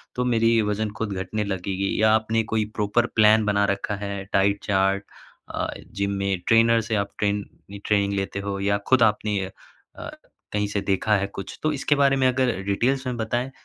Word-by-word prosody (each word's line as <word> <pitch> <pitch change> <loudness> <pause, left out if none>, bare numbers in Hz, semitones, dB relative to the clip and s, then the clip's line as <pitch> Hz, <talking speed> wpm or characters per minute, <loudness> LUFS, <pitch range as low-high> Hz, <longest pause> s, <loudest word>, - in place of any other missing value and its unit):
तो 125 - -1
मेरी 115 -1 +3
वज़न 105 +1 -1
खुद 110 -3 -2
घटने 100 +3 -3
लगेगी 95 +1 -2
या 110 0 +5
आपने 110 +1 0
कोई 110 -1 +1
प्रॉपर 105 +3 +1
प्लान 110 0 +5
बना 100 -1 +2
रखा 100 +1 -4
है, 100 -1 -4
डाइट 100 +1 +2
चार्ट 95 0 +1 0.5
अ, - - -1 0.3
जिम 100 0 -1
में 100 -1 -1
ट्रेनर 115 0 +5
से 115 0 -2
आप 100 -1 -1
ट्रेन 100 -1 0 0.3
ये 100 - -8
ट्रेनिंग 100 -1 +1
लेते 100 0 -2
हो 100 0 -4
या 100 +1 +1
खुद 130 -2 +5
आपने 105 -1 +1
अ, 95 - -9 1.0
कहीं 105 0 0
से 100 -1 -2
देखा 100 +2 +1
है 100 - -1
कुछ? 95 0 -8
तो 155 - +2
इसके 145 +1 +1
बारे 140 -1 +3
में 130 -1 +3
अगर 130 -3 +1
डिटेलस 125 +7 0
में 125 -1 -3
बताएँ, 120 +4 -2
105 Hz, 195 wpm, -24 LUFS, 100-115 Hz, 1.0 s, या